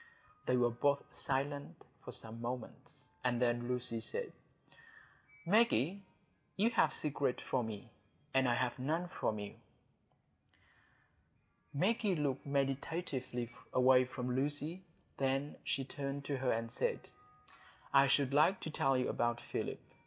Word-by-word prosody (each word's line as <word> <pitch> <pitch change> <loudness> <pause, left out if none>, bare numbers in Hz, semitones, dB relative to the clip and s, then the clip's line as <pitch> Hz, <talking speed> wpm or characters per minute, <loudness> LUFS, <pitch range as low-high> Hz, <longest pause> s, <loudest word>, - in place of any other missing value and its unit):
They 125 - +3
were 120 -1 +3
both 140 +4 +2
silent 140 +1 -2 0.2
for - - -7
some 115 +1 -7
moments, 120 0 -6
and 125 -1 +1
then 120 -1 +1
Lucy 125 -2 0
said,— 480 - -2 1.1
"Maggie, 200 - +3 0.6
you 220 +4 +3
have - - +4
secrets 145 -4 -1
from 125 -3 0
me, 110 +2 -7 0.4
and 135 -1 +4
I 120 - +3
have 125 +1 0
none 160 +7 -1
from 110 -10 -1
you." 105 -1 -5 2.2
Maggie 195 +5 +2
looked 145 -3 -1
meditatively 135 -3 -1 0.2
away 130 0 +6
from 125 -1 -3
Lucy. 145 +6 -1 0.4
Then 135 +2 0
she 135 - -1
turned 140 0 -4
to 140 -1 -1
her 130 -1 +1
and 115 0 -1
said, - - 0 0.9
"I 140 0 +7
should 140 -1 +3
like 165 +7 +5
to 160 - -4
tell 135 -3 +2
you 125 - +1
about 120 0 0
Philip. - - -3
135 Hz, 130 wpm, -35 LUFS, 125-145 Hz, 2.2 s, I